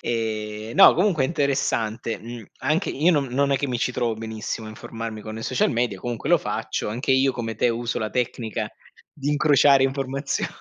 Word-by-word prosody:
Ehm, 110 -1 -3
no - - +9
comunque 175 -6 +2
è - - +2
interessante, 130 -7 -1
mhmm, 115 0 -8
anche 165 +6 0
io 155 +6 +3
non 145 -5 +2
non 140 +3 +1
è 140 - +3
che 145 - -1
mi 125 -2 -2
ci 125 - 0
trovo 120 -2 -1
benissimo 110 0 -5
a - - -7
informarmi 115 0 -7
con 110 +1 -7
social 125 +2 +1
media, 115 -4 -1
comunque 120 +2 -4
lo - - +5
faccio. - - -3
Anche 120 +6 -3
io, 135 0 +4
come 115 -3 -4
te, 120 - +2
uso 120 0 -2
la 110 -1 -3
tecnica 120 -3 -2 0.4
di 145 -2 -5
incrociare 145 -2 +5
informazio 135 +1 -1
120 Hz, 190 wpm, -24 LUFS, 110-140 Hz, 0.4 s, no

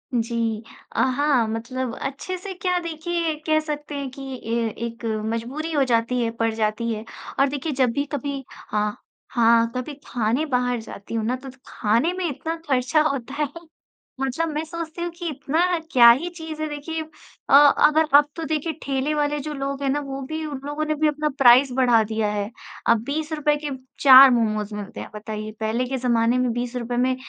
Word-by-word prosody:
जी। 230 -1 -1 0.3
अ, - - 0
हाँ, 260 -2 +2
मतलब 230 +2 -3
अच्छे 275 +7 -4
से 380 +1 -7
क्या 360 -1 -1
देखिए 335 0 -2
कह 310 0 +4
सकते 295 -1 -5
हैं 280 -2 -4
कि 275 +1 -10
ये 235 -4 -2 0.2
एक 230 0 -7 0.3
मजबूरी 275 +8 -4
हो 290 -3 +3
जाती 245 0 +1
है, 230 - -1
पड़ 230 -1 -1
जाती 220 +1 -1
है। 215 0 -5 0.4
और 275 - +5
देखिए 290 +2 -3
जब 255 -1 +2
भी 285 0 -1
कभी 280 -1 -3
हाँ। 210 0 -3 0.3
हाँ। 230 -1 +4
कभी 255 +4 -4
खाने 240 +6 0
बाहर 250 -3 0
जाती 215 0 -10
हूँ 225 -1 -1
ना 250 +3 0
तो 265 +1 -9 0.2
खाने 230 +12 +1
में 370 - -1
इतना 320 +4 -4
खर्चा 265 +3 +2
होता 270 -1 -4
है। - - 0 0.7
मतलब 290 +5 -1
मैं 305 +1 -2
सोचती 335 0 -6
हूँ 345 - -1
कि 345 -2 -4
इतना 325 +5 0
क्या 235 -2 +8
ही 305 +9 0
चीज़ 320 -1 -6
है? 310 - -1
देखिए 315 +2 -4 0.5
अ, - - +2
अगर 295 +2 +6
अब 290 0 +4
तो 330 - -5
देखिए 315 +1 -1
ठेले 275 +2 -1
वाले 295 0 0
जो 300 +2 -5
लोग 275 0 -4
हैं 275 - +1
ना 290 +2 +1
वो 275 0 -5
भी 315 0 -3
उन 285 -3 -5
लोगों 295 +1 -2
ने 310 0 0
भी 305 +1 +2
अपना 300 0 0
प्राइस 255 0 +6
बढ़ा 240 -3 +5
दिया 220 0 -1
है। 205 0 -2 0.4
अब 230 -1 +4
20 305 +2 -3
रुपये 300 -1 +2
के - - -1 0.3
4 265 -1 +10
मोमोज़ 215 -3 0
मिलते 205 0 -7
हैं - - -8
बताइए। 215 0 -6
पहले 225 +3 0
के 265 - -1
जमाने 240 -1 +2
में 250 -1 +1
20 245 +1 -3
रुपये 240 0 -3
में 255 +1 +2
270 Hz, 200 wpm, -23 LUFS, 235-300 Hz, 0.7 s, 4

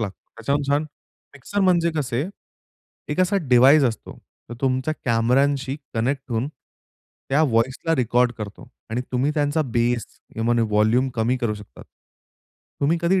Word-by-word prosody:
लागतो, 100 -3 -3 0.2
त्याच्याहून 140 +6 0
छान. 145 +2 +3 0.5
मिक्सर 200 +9 -4
म्हणजे 170 -3 +3
कसे? 135 -1 -1 0.8
एक 150 +5 -1
असा 185 +2 +2
डिव्हाइस 135 +4 +6
असतो 115 -3 -3 0.3
तो 120 - -6
तुमच्या 130 +3 0
कॅमेरांशी 135 +4 +1 0.2
कनेक्ट 130 +5 0
होऊन, 115 +4 -1 0.8
त्या 145 +4 +3
व्हॉइसला 130 +5 +1
रेकॉर्ड 125 0 +2
करतो 105 -1 -8 0.2
आणि 120 - -1
तुम्ही 130 +4 +1
त्यांचा 150 +1 +1
बेस 120 -2 0 0.3
किंवा 115 +1 +1
व्हॉल्युम 110 +4 +2
कमी 115 +2 +1
करू 120 -4 -1
शकता. 105 -1 -13 1.0
तुम्ही 160 +4 +2
कधी 185 +2 +3
130 Hz, 135 wpm, -23 LUFS, 115-145 Hz, 1.0 s, डिव्हाइस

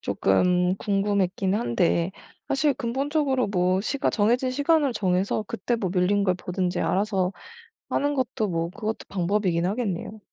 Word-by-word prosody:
쪼끔 180 - +2
궁금했긴 195 -1 0
한데 170 - +1 0.4
사실 280 0 +2
근본적으로 265 +1 0
뭐 185 -1 +1
시가 270 +6 -1
정해진 240 +4 +2
시간을 285 0 +2
정해서 195 +2 0
그때 235 +1 -2
뭐 190 -5 -2
밀린 200 +3 +2
걸 185 -2 +2
보든지 180 0 -2
알아서 195 -2 0 0.6
하는 290 +1 0
것도 225 -5 -1
뭐 165 0 -1
그것도 220 +2 -4
방법이긴 180 -2 0
하겠네요. 210 0 -3
200 Hz, 320 characters per minute, -25 LUFS, 180-240 Hz, 0.6 s, 쪼끔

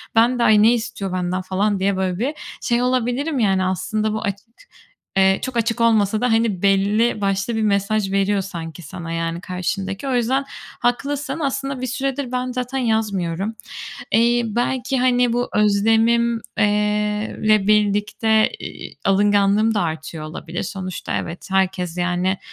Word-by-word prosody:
ben 240 +2 +4
de - - +3
"Ay 210 -2 +5
ne 230 +2 +6
istiyor 225 -5 -3
benden?" 185 0 -1
falan 195 +2 0
diye 195 0 +1
böyle 185 -1 -1
bir 270 +7 -1 0.3
şey 240 -1 +1
olabilirim 255 +4 0
yani, 195 -4 +2
aslında 190 +4 -1
bu 220 - -2
aç 200 -1 -1 0.8
eee, 190 0 +4
çok 260 -2 -3
açık 230 +1 0
olmasa 220 -1 +3
da, 250 - +2
hani 225 -5 +1
belli 205 +3 +2
başlı 195 +3 0
bir 220 - 0
mesaj 200 0 +1
veriyor 195 0 +1
sanki 170 -3 -7
sana, 165 +2 -7
yani, 165 +1 -2
karşındaki. 195 +5 -3
O 260 - 0
yüzden 260 +3 +1 0.3
haklısın, 280 +4 -1
aslında 275 -1 -2
bir 255 - -2
süredir 270 +1 -2
ben 255 0 -2
zaten 250 +1 -3
yazmıyorum. 210 -4 -1 0.6
Eee, 235 +1 +4
belki, 245 +3 -1
hani, 245 -1 +3
bu 245 +1 0
özlemim 225 +3 +3 0.2
eee, 215 - +4 0.8
le 215 -2 +4
birlikte, 210 +1 +2
iii, - - -8
alınganlığım 205 +2 +3
da 205 - +1
artıyor 160 -1 -4
olabilir. 165 +2 -6
Sonuçta 185 -1 -4
evet, 170 +5 -5
herkes, 185 -2 0
yani, 180 +2 0
210 Hz, 150 wpm, -21 LUFS, 190-240 Hz, 0.8 s, ne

